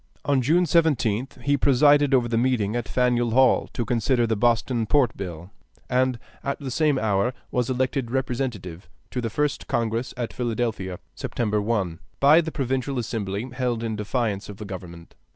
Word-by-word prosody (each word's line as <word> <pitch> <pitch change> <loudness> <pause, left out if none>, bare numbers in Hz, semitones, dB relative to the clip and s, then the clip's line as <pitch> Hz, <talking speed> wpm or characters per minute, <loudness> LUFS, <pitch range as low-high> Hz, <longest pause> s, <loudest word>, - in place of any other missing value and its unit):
On 140 -2 +2
June 160 +8 +3
17th 140 -8 +1
he 145 0 +2
presided 145 +1 +4
over 125 -3 +3
the 115 - -1
meeting 115 -3 +1
at 120 -1 -2
Faneuil 125 -1 +1
Hall 130 0 +4
to 120 - -2
consider 120 +2 +1
the 110 -1 0
Boston 115 +1 +1
Port 135 -4 +3
Bill, 90 -1 -7 0.4
and 130 0 +2 0.3
at 140 - -2
the 135 -3 -5
same 150 0 +2
hour 110 +1 +1 0.2
was 125 -1 0
elected 130 -1 -1
Representative 120 - -3 0.2
to 125 - -2
the 115 - -2
first 145 +5 -1
Congress 115 +2 -1
at 120 -2 -3
Philadelphia 115 -6 -2 0.2
(September 105 -3 -1
1) 100 -6 -1 0.2
by 150 +4 +6
the 160 -1 -5
Provincial 135 -1 -2
Assembly 110 -2 -3
held 125 -3 -1
in 110 -1 -2
defiance 105 -1 -2
of 100 - -8
the 105 - -7
government. 85 -3 -9
120 Hz, 170 wpm, -24 LUFS, 110-130 Hz, 0.4 s, by